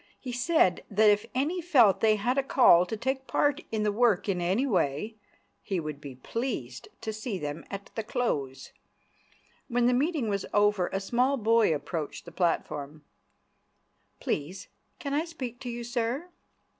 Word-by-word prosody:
He 255 - -6
said 245 - +2
that 210 +1 +5
if 210 +2 0
any 315 +8 0
felt 255 - +5
they 220 -1 +4
had 245 +6 0
a - - +3
call 180 -10 +5
to 220 - -4
take 265 +3 -2
part 290 +2 +1
in 220 -1 -1
the 210 - +2
work 215 -3 +2
in 185 -3 0
any 190 +10 +1
way, 185 - 0 0.5
he 190 -3 -2
would 150 -3 -6
be 140 -3 -8
pleased 130 - -4
to 220 -1 -4
see 215 -1 -4
them 150 -1 -5
at 200 0 -7
the 225 - -2
close. 150 - -3 1.0
When 245 -1 +1
the 250 - +4
meeting 285 -1 0
was 200 -2 -2
over, 205 -3 +3
a 195 - -2
small 250 +7 +1
boy 225 -3 +3
approached 155 0 -4
the 170 - -10
platform. 150 -4 -2 1.1
"Please 160 +6 -4 0.3
can 280 -1 -4
I 300 +2 +1
speak 260 -8 -7
to 250 - -6
you, 240 0 -5
sir?" 240 +7 -2
220 Hz, 170 wpm, -28 LUFS, 180-250 Hz, 1.1 s, that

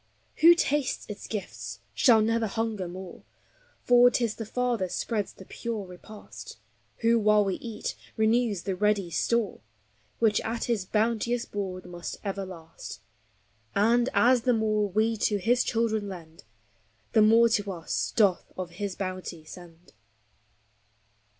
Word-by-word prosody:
Who 340 +2 +8
tastes 295 -4 0
its 210 -1 -8
gifts 210 -4 -6
shall 225 -4 +5
never 225 0 +1
hunger 220 -3 -2
more, 180 +1 -9 0.6
For 245 0 +6
't 245 -1 +1
is 220 - -2
the 225 -2 -7
Father 240 -5 -1
spreads 210 +2 -2
the 190 - -14
pure 225 -1 -5
repast, 190 +4 -11 0.4
Who, 230 0 +4
while 210 -1 +4
we 190 -2 -1
eat, 225 -3 -5 0.2
renews 220 -3 +2
the 195 - -2
ready 200 -2 +1
store, 230 +5 0 0.6
Which 220 -2 +2
at 230 +1 -3
his 225 -6 -1
bounteous 230 +3 0
board 190 -3 -5
must 175 -1 -7
ever 195 -1 -3
last; 165 -10 -10 0.7
And, 235 +5 +3
as 250 0 +5
the 250 +1 +2
more 215 -2 +1
we 220 +3 +1
to 210 0 +1
his 240 +6 +2
children 220 -3 0
lend, 165 -6 -11 0.7
The 220 - +5
more 225 +2 +6
to 205 -2 0
us 170 -3 -3
doth 200 -6 +2
of 180 -2 -5
his 195 +2 -4
bounty 185 -4 -5
send. 170 +1 -13
210 Hz, 145 wpm, -27 LUFS, 185-230 Hz, 0.7 s, Who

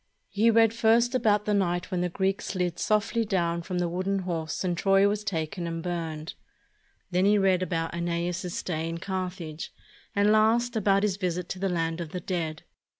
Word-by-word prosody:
He 220 +3 +3
read 225 -1 +5
first 230 +2 +3
about 215 -5 +2
the 210 - +1
night 175 -2 0
when 180 -1 0
the 180 - 0
Greeks 190 +2 -1
slid 180 -3 -2
softly 215 +2 +1
down 170 -5 0
from 180 +2 -4
the 175 -1 +1
wooden 185 +3 -1
horse 165 -2 -3
and 180 -2 0
Troy 195 +2 +4
was 205 +1 -1
taken 170 -2 -3
and 165 0 -4
burned; 165 -3 -4 0.8
then 180 +2 +2
he 205 +1 +5
read 190 -2 +3
about 165 -3 -2
^neas's 170 +1 -2
stay 165 -2 -2
in 165 - -4
Car 185 +1 -2
thage; 160 -3 -7 0.5
and 205 +1 +4
last, 230 +3 +3
about 200 -2 +3
his 200 -3 +1
visit 180 -2 -2
to 185 - -5
the 195 0 0
land 165 -1 -1
of 160 -2 -7
the 180 - -2
dead. 165 -3 -3
185 Hz, 195 wpm, -27 LUFS, 170-205 Hz, 0.8 s, read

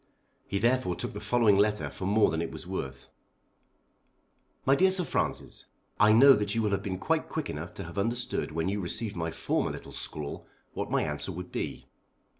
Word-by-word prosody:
He 100 - -1
therefore 120 -4 +1
took - - -4
the 105 - -5
following 110 -1 +3
letter 105 +1 +2
for 95 - -5
more 105 -1 +4
than 80 0 -1
it 85 - -3
was - - -8
worth. 70 -8 -6 1.5
MY 135 - +5
DEAR 190 +5 +5
SIR 185 -1 +4
FRANCIS, - - -2 0.3
I 105 0 +6
know 135 +5 +8
that 105 -3 0
you 115 - +1
will 105 - +1
have 100 -1 0
been 95 -2 -3
quite - - -1
quick - - -3
enough 80 +4 -7
to 100 - -5
have 85 +3 -6
understood 120 -2 -1
when 80 +2 -1
you 100 +2 -1
received 100 +4 -2
my 85 -1 -2
former - - -1
little - - -8
scrawl 75 -2 -4 0.3
what - - -4
my - - +1
answer 75 +6 -3
would 90 +1 -7
be. - - -4
100 Hz, 200 wpm, -29 LUFS, 85-115 Hz, 1.5 s, know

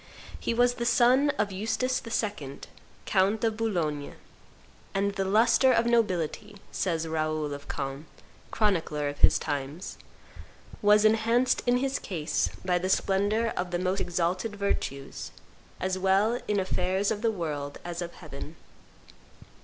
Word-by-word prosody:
He - - -1
was 245 +1 +3
the 235 - -4
son 250 +4 +4
of 210 -1 0
Eustace 225 +6 -1
II., 200 -12 -3 0.4
count 200 +3 +2
of 225 -1 +1
Boulogne, 170 -10 -2 0.8
and 200 +1 +1
"the 195 -1 -1
lustre 230 +6 +4
of 230 -1 +3
nobility," 210 -3 0 0.2
says 165 -3 -1
Raoul 155 -2 -1
of 140 0 -9
Caen, 135 +3 -4 0.4
chronicler 165 -8 0
of 145 - -8
his - - +6
times, 145 +4 -4 0.8
"was 210 0 +5
enhanced 230 +3 +3
in 245 0 +4
his 270 +1 -1
case 165 -4 -1 0.2
by 180 -1 +2
the 185 +1 -2
splendor 205 +4 +1
of 180 0 -2
the 175 - -1
most 185 +2 0
exalted 180 +4 -1
virtues, 140 -9 -3 0.5
as 185 0 -1
well 195 +5 +2
in 210 -1 +1
affairs 190 +1 0
of 210 -1 -2
the 230 - +2
world 150 -8 -4
as 175 0 -4
of 170 0 -5
heaven. 155 -1 -9
195 Hz, 140 wpm, -28 LUFS, 165-225 Hz, 0.8 s, his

